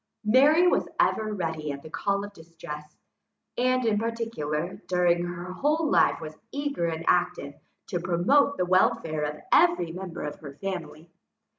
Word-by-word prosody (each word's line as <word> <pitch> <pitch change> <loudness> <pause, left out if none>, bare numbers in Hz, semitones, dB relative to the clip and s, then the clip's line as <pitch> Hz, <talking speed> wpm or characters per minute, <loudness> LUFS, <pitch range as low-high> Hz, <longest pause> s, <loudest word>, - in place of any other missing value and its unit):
Mary 290 +10 +5
was - - +2
ever 215 0 +2
ready 160 -6 -3
at 140 0 -7
the 155 - -10
call 200 +3 -1
of 205 - -11
distress, 160 -3 -10 0.6
and, 255 0 +1
in 210 -2 +2
particular, 200 -6 -3
during 175 -1 +2
her 175 +1 -6
whole 305 - +1
life - - +4
was 155 -1 -8 0.2
eager 280 -11 -2
and 165 0 -4
active 175 -5 +1 0.3
to 180 -5 -3
promote 190 +12 +2
the 180 - +1
welfare 165 -4 +2
of 150 0 -4
every 345 - +4
member 180 0 -6
of 150 0 -5
her 140 -2 -10
family. 170 -2 -6
180 Hz, 155 wpm, -26 LUFS, 160-225 Hz, 0.6 s, Mary